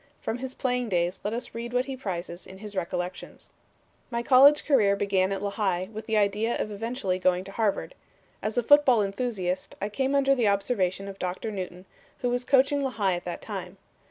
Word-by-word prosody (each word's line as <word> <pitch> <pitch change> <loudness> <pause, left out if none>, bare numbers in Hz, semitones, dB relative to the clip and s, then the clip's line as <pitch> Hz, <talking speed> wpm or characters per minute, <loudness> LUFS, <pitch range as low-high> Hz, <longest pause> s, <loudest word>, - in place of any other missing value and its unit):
From 225 +2 -3
his 260 0 -5
playing 250 -2 -1
days 175 0 0
let 205 - -1
us 240 +3 -4
read 235 +1 -5
what 250 +1 +2
he 270 - -5
prizes 180 -7 -5
in 190 - -11
his 210 0 -8
recollections: 180 0 -5 0.6
"My 235 -1 -2
college 275 +4 +6
career 215 -9 +4
began 195 -1 +1
at 195 0 -3
Lehigh, 195 -3 -1
with 220 +1 -6
the 220 -1 +1
idea 210 +3 +1
of 215 - -3
eventually 205 -3 -2
going 185 0 +2
to 195 - -9
Harvard. 210 -1 -1 0.5
As 215 +2 -3
a 245 - +3
football 260 -4 +6
enthusiast, 195 -3 -2
I 205 - -2
came 265 +5 0
under 275 0 +4
the 245 -5 +2
observation 195 -2 0
of 195 0 -8
Doctor 185 +5 -3
Newton, 185 -2 -6 0.4
who 245 - 0
was 245 0 0
coaching 275 +2 +3
Lehigh 220 -8 0
at 175 0 -4
that 175 - -5
time. 190 -3 -6
210 Hz, 195 wpm, -27 LUFS, 190-245 Hz, 0.6 s, college